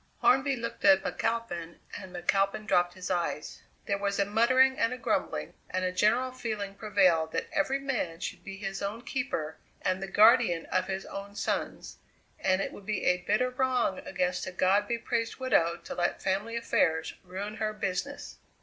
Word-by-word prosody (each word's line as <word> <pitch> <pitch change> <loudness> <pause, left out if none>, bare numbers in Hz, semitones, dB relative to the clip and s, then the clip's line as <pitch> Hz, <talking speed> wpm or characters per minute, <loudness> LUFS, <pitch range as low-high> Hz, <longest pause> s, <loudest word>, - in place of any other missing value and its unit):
Hornby 265 +1 +4
looked 235 -1 -6
at 290 -1 +6
McAlpin 200 -8 -2 0.2
and 190 -2 -8
McAlpin 195 +4 +1
dropped 175 -3 +2
his 185 0 -5
eyes; 175 -4 -2 0.2
there 200 0 -1
was 200 0 -1
a 200 - +3
muttering 255 +5 +4
and 230 - +2
a 250 - -3
grumbling, - - -1 0.2
and 185 0 -1
a 185 - 0
general 235 +7 +2
feeling 215 -6 -4
prevailed 185 -6 +2
that - - -1
every 275 -2 +1
man 250 -12 -2
should - - -5
be 195 0 -7
his 195 -1 -4
own 205 +4 -4
keeper 245 - -3 0.2
and 185 0 -1
the 195 - -3
guardian 210 -4 +5
of 185 - +1
his 190 0 -3
own 200 +1 -8
sons, - - -3 0.4
and 190 0 +2
it - - -4
would 200 - -12
be 215 -2 -1
a 180 - +4
bitter 210 +8 +1
wrong 250 -6 +1
against 180 +1 -2
a - - -4
God 190 +3 +2
be 235 - 0
praised 230 0 -2
widow 170 -10 +2
to - - -6
let 175 -1 0
family 200 +5 -1
affairs 160 -8 +1
ruin 195 +4 -6
her 215 0 -1
business. 210 +7 -4
200 Hz, 180 wpm, -29 LUFS, 185-235 Hz, 0.4 s, at